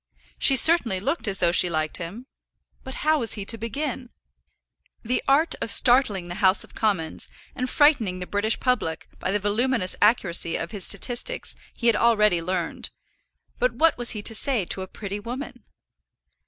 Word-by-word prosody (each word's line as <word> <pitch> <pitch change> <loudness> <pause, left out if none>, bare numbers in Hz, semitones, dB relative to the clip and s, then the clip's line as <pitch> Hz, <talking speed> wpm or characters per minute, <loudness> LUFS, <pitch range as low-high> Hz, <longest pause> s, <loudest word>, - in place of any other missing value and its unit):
She 270 - +5
certainly 255 - +5
looked 235 - -3
as 195 -1 +3
though 175 -1 +2
she 175 0 +4
liked 155 -2 -1
him; 185 +8 -8 0.6
but 265 - -8
how 310 0 +3
was 230 -3 0
he 205 -3 -6
to 230 - +1
begin? 250 +2 -5 0.9
The 245 +2 -1
art 290 +5 +2
of - - -2
startling 240 -9 +3
the 175 +3 -7
House 190 0 +4
of - - -15
Commons 190 -8 -2 0.3
and 255 0 -3
frightening 275 - +2
the 180 - -6
British 205 +4 -1
public 240 -11 -2
by - - -3
the 205 - +1
voluminous 210 0 0
accuracy 190 -6 +2
of 165 - -4
his 205 -5 -1
statistics 250 - -1 0.2
he 235 - -7
had 230 -2 +4
already 210 -6 +2
learned; 175 0 -4 0.7
but 250 0 +1
what 320 +5 +2
was 240 -1 +2
he 205 - -6
to 225 - 0
say 230 -3 +1
to 190 - -4
a 190 - -6
pretty 200 +1 -7
woman? 245 +7 -8
220 Hz, 175 wpm, -23 LUFS, 185-255 Hz, 0.9 s, She